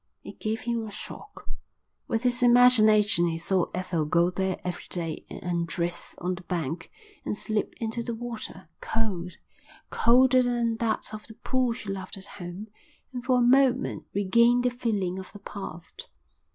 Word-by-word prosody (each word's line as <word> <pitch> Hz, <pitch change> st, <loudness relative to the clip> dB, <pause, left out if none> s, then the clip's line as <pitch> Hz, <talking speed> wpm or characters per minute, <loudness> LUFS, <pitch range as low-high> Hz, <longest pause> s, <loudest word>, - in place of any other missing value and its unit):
It -, -, -10 dB
gave 220 Hz, +2 st, -2 dB
him 235 Hz, -2 st, -2 dB
a -, -, -6 dB
shock. 215 Hz, -, -9 dB, 0.6 s
With 225 Hz, 0 st, -1 dB
his 245 Hz, -1 st, +1 dB
imagination 215 Hz, -7 st, +6 dB
he 165 Hz, -1 st, -1 dB
saw 180 Hz, +1 st, +1 dB
Ethel 180 Hz, -4 st, -1 dB
go 170 Hz, +3 st, +3 dB
there 190 Hz, 0 st, -1 dB
every 180 Hz, -1 st, -4 dB
day 165 Hz, -3 st, -3 dB
and -, -, -8 dB
undress 170 Hz, 0 st, -2 dB
on 180 Hz, +1 st, -2 dB
the 180 Hz, -, -7 dB
bank 165 Hz, -2 st, -3 dB, 0.3 s
and 210 Hz, -, -2 dB
slip 215 Hz, -1 st, -2 dB
into 225 Hz, +1 st, -2 dB
the 230 Hz, 0 st, -4 dB
water, 235 Hz, -1 st, -7 dB
cold, 185 Hz, -6 st, -2 dB, 0.6 s
colder 255 Hz, +2 st, +5 dB
than 240 Hz, -2 st, 0 dB
that 220 Hz, -1 st, -1 dB
of 215 Hz, 0 st, -8 dB
the 220 Hz, -, -10 dB
pool 255 Hz, 0 st, 0 dB
she 210 Hz, -, -8 dB
loved 190 Hz, 0 st, -5 dB
at 195 Hz, -, -8 dB
home, 190 Hz, +2 st, -8 dB, 0.4 s
and 245 Hz, -1 st, -5 dB
for 255 Hz, -1 st, +3 dB
a -, -, +3 dB
moment 260 Hz, +1 st, +3 dB
regain 235 Hz, +5 st, +4 dB
the 250 Hz, 0 st, +1 dB
feeling 205 Hz, -7 st, -1 dB
of 190 Hz, -, -9 dB
the 205 Hz, -, -10 dB
past. 175 Hz, -5 st, -8 dB
215 Hz, 165 wpm, -27 LUFS, 180-240 Hz, 0.6 s, imagination